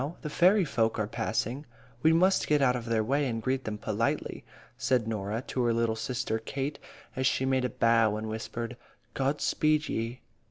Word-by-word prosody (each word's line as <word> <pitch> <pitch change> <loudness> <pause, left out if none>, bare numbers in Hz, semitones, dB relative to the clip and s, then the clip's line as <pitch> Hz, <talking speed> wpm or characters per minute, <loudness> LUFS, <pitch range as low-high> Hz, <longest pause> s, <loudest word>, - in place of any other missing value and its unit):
The 150 - -4
fairy 185 +4 +4
folk 115 -5 0
are 110 - 0
passing 110 +2 -2
along. 145 - -11 0.4
We 160 - +5
must 185 +4 +3
get 150 -1 +3
out 125 -3 +3
of 120 -2 -4
their 115 -2 +1
way, 140 +5 +1
and 115 -2 -2
greet 130 +3 -1
them 105 -1 -3
politely," - - -2 0.3
said 125 -4 +1
Norah 110 +1 -2
to 130 - -1
her 120 -1 +2
little 115 -1 +1
sister 110 -1 -2
Kate, 135 +5 -4 0.4
as 130 0 +1
she 130 - +1
made 130 -1 +1
a - - 0
bow, 115 -1 +3
and 110 +1 -4
whispered, 115 +2 -5 0.4
"God 135 +2 0
speed 155 0 +1
ye." 115 +3 -3
125 Hz, 195 wpm, -29 LUFS, 115-140 Hz, 0.4 s, We